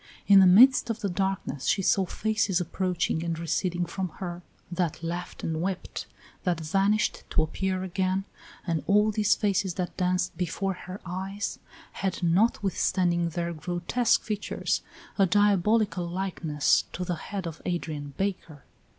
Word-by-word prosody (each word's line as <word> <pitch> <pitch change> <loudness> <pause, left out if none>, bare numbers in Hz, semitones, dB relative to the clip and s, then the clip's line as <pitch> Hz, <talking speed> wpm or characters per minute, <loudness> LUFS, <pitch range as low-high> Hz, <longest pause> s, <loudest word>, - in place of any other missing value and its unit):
In 200 -1 +8
the 190 - +7
midst 240 +8 +7
of 225 -1 -3
the 200 - -1
darkness 190 -7 -2
she 195 - +2
saw 190 0 +3
faces 215 -2 0
approaching 180 -1 -1
and 165 -1 -2
receding 175 +2 -1
from 185 +1 -3
her, 175 -2 -5 0.3
that 175 -2 -2
laughed 175 +1 -5
and 160 -1 -2
wept, 185 0 -4 0.4
that 175 -4 0
vanished 195 +6 +1
to 155 - +2
appear 185 +3 -2
again, 190 +1 -1 0.4
and 165 -4 0
all 210 +2 +4
these 210 -1 +3
faces 195 -3 0
that 180 -2 -3
danced 180 0 0
before 190 +2 -2
her 185 +1 -8
eyes 190 +3 -4 0.3
had, 190 -2 -3
notwithstanding 180 -2 +2
their 170 +1 -3
grotesque 175 +9 0
features, 210 -2 -2 0.4
a 195 - +5
diabolical 205 -1 +2
likeness 170 -5 +1
to 180 - -3
the 180 - -1
head 190 +3 -5
of 165 -1 -6
Adrian 150 -5 -3
Baker. 180 -7 -3
185 Hz, 145 wpm, -27 LUFS, 170-195 Hz, 0.4 s, In